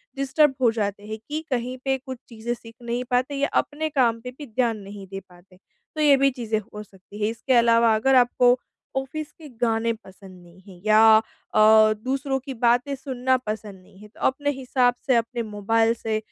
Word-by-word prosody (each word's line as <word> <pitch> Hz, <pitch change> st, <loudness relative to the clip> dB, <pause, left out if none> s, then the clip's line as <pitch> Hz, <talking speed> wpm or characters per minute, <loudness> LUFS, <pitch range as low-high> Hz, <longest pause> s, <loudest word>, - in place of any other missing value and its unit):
Disturb 275 Hz, +1 st, +2 dB
हो 235 Hz, -, +4 dB
जाते 205 Hz, -2 st, -3 dB
हैं, 215 Hz, 0 st, -5 dB
कि 305 Hz, +1 st, -3 dB
कहीं 250 Hz, 0 st, -2 dB
पे 270 Hz, 0 st, +1 dB
कुछ 260 Hz, -1 st, -8 dB
चीज़ें 230 Hz, 0 st, -4 dB
सीख 230 Hz, -1 st, -13 dB
नहीं 240 Hz, +1 st, -3 dB
पाते 255 Hz, +3 st, +1 dB
या 280 Hz, +1 st, 0 dB, 0.2 s
अपने 310 Hz, +2 st, -4 dB
काम 245 Hz, -6 st, +1 dB
पे 250 Hz, +1 st, -7 dB
भी 295 Hz, -, -8 dB
ध्यान 230 Hz, -1 st, 0 dB
नहीं 200 Hz, 0 st, -10 dB
दे 195 Hz, +1 st, -7 dB
पाते, 185 Hz, -1 st, -21 dB, 0.4 s
तो 310 Hz, -, -2 dB
ये 290 Hz, -2 st, +6 dB
भी 275 Hz, +1 st, +4 dB
चीज़ें 225 Hz, -4 st, -2 dB
हो 210 Hz, 0 st, -10 dB
सकती 200 Hz, +1 st, -14 dB
हैं। 210 Hz, -, +2 dB
इसके 245 Hz, +3 st, -2 dB
अलावा 230 Hz, -1 st, +4 dB
अगर 265 Hz, +5 st, +2 dB
आपको 245 Hz, 0 st, +4 dB, 0.4 s
ऑफिस 285 Hz, +3 st, -4 dB
के 315 Hz, -, -14 dB
गाने 230 Hz, 0 st, +1 dB
पसंद 190 Hz, -4 st, -15 dB
नहीं 175 Hz, +2 st, -18 dB
है, 180 Hz, -3 st, -14 dB
या 220 Hz, +1 st, +7 dB, 0.4 s
अ, 215 Hz, 0 st, +6 dB
दूसरों 270 Hz, +5 st, -2 dB
की 270 Hz, +1 st, -7 dB
बातें 245 Hz, +3 st, +1 dB
सुनना 260 Hz, -1 st, -1 dB
पसंद 215 Hz, -5 st, -7 dB
नहीं 185 Hz, -, -21 dB
है, 210 Hz, -, -13 dB
तो 210 Hz, -, -22 dB
अपने 285 Hz, +2 st, 0 dB
हिसाब 255 Hz, -2 st, +1 dB
से 260 Hz, -, +4 dB
अपने 235 Hz, +1 st, -1 dB
मोबाइल 225 Hz, +2 st, +1 dB
से 225 Hz, -2 st, -3 dB
235 Hz, 200 wpm, -24 LUFS, 215-265 Hz, 0.4 s, या